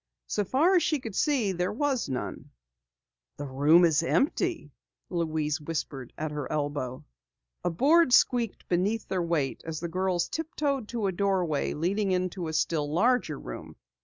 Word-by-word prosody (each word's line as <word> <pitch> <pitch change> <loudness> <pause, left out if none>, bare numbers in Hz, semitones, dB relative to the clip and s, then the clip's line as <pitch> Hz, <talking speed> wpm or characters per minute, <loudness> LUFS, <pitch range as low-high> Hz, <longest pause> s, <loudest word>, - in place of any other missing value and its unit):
So 210 - -1
far 300 - +3
as - - +3
she 305 -1 +1
could 225 -5 -7
see 255 -5 +1
there 180 0 -1
was 260 - -1
none. 130 -1 -5 0.9
"The 145 - -5
room 145 +6 +5
is 160 -2 +3
empty!" 290 - 0 0.4
Louise 155 -3 -1
whispered 145 -5 -4
at 155 0 -3
her 150 -2 -4
elbow. 145 -4 -3 0.6
A - - +1
board 285 - +4
squeaked 240 -3 +3
beneath 195 +6 0
their 185 -2 -1
weight 165 -6 -1
as 160 -1 -5
the 170 - -3
girls 180 0 0
tiptoed 290 -6 -2
to 230 -3 -3
a 195 - +1
doorway 185 -5 0
opening 195 +6 0
into 180 -1 -2
a 160 - -4
still 155 -2 0
larger 240 +10 +2
room. - - -8
180 Hz, 160 wpm, -28 LUFS, 155-235 Hz, 0.9 s, room